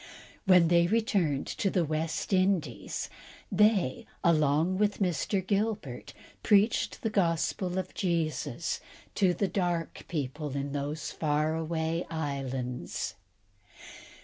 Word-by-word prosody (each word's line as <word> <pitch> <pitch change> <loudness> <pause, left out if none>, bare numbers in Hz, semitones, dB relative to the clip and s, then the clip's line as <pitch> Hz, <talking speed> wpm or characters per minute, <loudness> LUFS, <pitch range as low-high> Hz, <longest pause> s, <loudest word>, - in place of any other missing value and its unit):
When 180 -4 +6
they 170 0 +5
returned 190 -9 +1
to 195 - -1
the 180 -3 +1
West 155 +5 -2
Indies, 185 - 0 0.4
they, 195 - +3 0.2
along 160 +3 +3
with 210 -1 +2
Mr. 190 +1 0
Gilbert, 200 - -2 0.3
preached 210 +2 +3
the 225 - 0
gospel 180 0 0
of 185 - -3
Jesus 160 -5 -1
Christ - - -22
to 190 -3 +4
the 200 +4 +1
dark 175 -4 -2
people 145 -2 -3
in 140 0 -3
those 145 +2 -3
far 155 0 0
away 160 +1 -1
islands. 135 -5 -3
165 Hz, 115 wpm, -29 LUFS, 150-190 Hz, 0.4 s, When